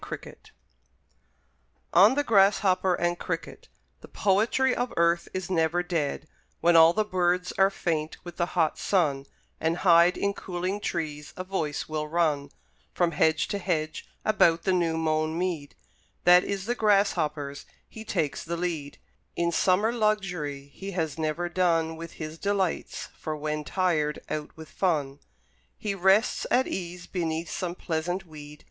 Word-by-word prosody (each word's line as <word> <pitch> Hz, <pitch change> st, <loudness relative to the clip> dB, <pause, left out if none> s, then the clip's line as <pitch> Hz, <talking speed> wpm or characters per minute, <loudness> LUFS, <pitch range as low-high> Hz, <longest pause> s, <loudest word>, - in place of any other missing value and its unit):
Wordsworth -, -, -9 dB, 1.4 s
ON 200 Hz, +8 st, +7 dB
THE 290 Hz, -, +1 dB
GRASSHOPPER 195 Hz, -4 st, +3 dB
AND 175 Hz, 0 st, -1 dB
CRICKET -, -, -5 dB, 0.3 s
The -, -, -13 dB
poetry 225 Hz, +6 st, +2 dB
of 245 Hz, 0 st, -2 dB
earth 170 Hz, 0 st, +2 dB
is 185 Hz, 0 st, -4 dB
never 170 Hz, 0 st, +1 dB
dead: 155 Hz, -4 st, -2 dB, 0.3 s
When 170 Hz, 0 st, +4 dB
all 165 Hz, 0 st, +8 dB
the 215 Hz, +4 st, 0 dB
birds 180 Hz, -1 st, 0 dB
are 195 Hz, 0 st, +6 dB
faint 160 Hz, -5 st, -2 dB
with 175 Hz, -1 st, -9 dB
the 170 Hz, -, 0 dB
hot 160 Hz, -3 st, +2 dB
sun, 145 Hz, -8 st, +1 dB, 0.3 s
And 160 Hz, +2 st, 0 dB
hide 170 Hz, 0 st, +6 dB
in 200 Hz, 0 st, 0 dB
cooling 185 Hz, +1 st, -3 dB
trees, 150 Hz, -5 st, -4 dB
a 185 Hz, -, -3 dB
voice 175 Hz, -6 st, -3 dB
will 155 Hz, -1 st, -3 dB
run 150 Hz, -3 st, 0 dB, 0.5 s
From 175 Hz, -1 st, +2 dB
hedge 160 Hz, 0 st, +2 dB
to 200 Hz, -, -2 dB
hedge 155 Hz, -4 st, -2 dB, 0.2 s
about 170 Hz, -6 st, +3 dB
the 190 Hz, -, +2 dB
new 170 Hz, -3 st, +1 dB
mown 155 Hz, 0 st, 0 dB
mead; 170 Hz, -5 st, -3 dB, 0.5 s
That 180 Hz, 0 st, +7 dB
is 195 Hz, -1 st, -3 dB
the 240 Hz, -, 0 dB
Grasshopper's 155 Hz, -10 st, 0 dB, 0.2 s
he 220 Hz, -, -10 dB
takes 165 Hz, -9 st, -2 dB
the 170 Hz, +1 st, -4 dB
lead 165 Hz, -5 st, -3 dB, 0.4 s
In 170 Hz, 0 st, 0 dB
summer 195 Hz, +6 st, +2 dB
luxury 180 Hz, -11 st, -1 dB
he 195 Hz, 0 st, -7 dB
has 160 Hz, -3 st, -2 dB
never 160 Hz, +3 st, -1 dB
done 165 Hz, -2 st, +1 dB
With 165 Hz, +1 st, -8 dB
his 155 Hz, 0 st, -7 dB
delights; 200 Hz, -3 st, -2 dB
for 155 Hz, -1 st, -5 dB
when 150 Hz, 0 st, -3 dB
tired 155 Hz, -4 st, 0 dB
out 150 Hz, 0 st, -5 dB
with 160 Hz, -1 st, -10 dB
fun 145 Hz, -7 st, -1 dB, 0.6 s
He 210 Hz, -2 st, -3 dB
rests 195 Hz, +4 st, +2 dB
at 260 Hz, +1 st, +3 dB
ease 180 Hz, -1 st, -5 dB
beneath 165 Hz, -2 st, -3 dB
some 180 Hz, -2 st, -3 dB
pleasant 175 Hz, +3 st, -3 dB
weed. 150 Hz, -2 st, -11 dB
170 Hz, 155 wpm, -27 LUFS, 155-190 Hz, 1.4 s, all